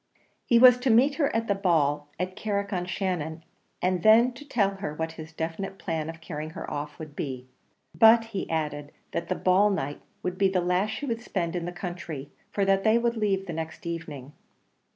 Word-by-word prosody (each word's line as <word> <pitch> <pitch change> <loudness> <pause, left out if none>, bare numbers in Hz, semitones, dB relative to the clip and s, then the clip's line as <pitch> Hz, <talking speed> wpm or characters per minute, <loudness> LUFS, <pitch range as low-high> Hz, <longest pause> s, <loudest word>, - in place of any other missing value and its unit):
He 235 - +5
was 250 0 +8
to 255 +1 0
meet 250 +6 +5
her 280 - +3
at 225 0 0
the 200 - +3
ball 150 -7 +1
at 185 +1 -3
Carrick 200 -1 -2
on 180 -1 -1
Shannon, 175 -4 -3 0.4
and 180 -1 +1
then 230 +5 +6
tell 240 -7 -1
her 150 -6 -4
what 160 +1 -3
his 160 -1 -10
definite 165 +5 -4
plan 160 -4 -3
of 165 0 -8
carrying 155 -1 -5
her - - -5
off 145 0 -5
would 155 -3 -9
be; 130 -4 -4 0.5
but 225 0 +6
he 195 - -3
added 150 -2 -3 0.2
that - - -3
the 185 - +1
ball 185 +4 +4
night 145 -7 -3 0.2
would 180 0 -3
be 195 -1 +4
the 190 -1 +1
last 180 +4 +1
she 285 - -4
would 230 -3 -2
spend 175 -7 -2
in 175 -1 -2
the 175 - -3
country, 175 -6 -6 0.2
for 200 - 0
that 195 0 +3
they 220 +1 +5
would 235 0 +1
leave 200 -3 0
the 170 - -5
next 160 0 -6
evening. 150 -5 -6
180 Hz, 205 wpm, -27 LUFS, 160-210 Hz, 0.5 s, was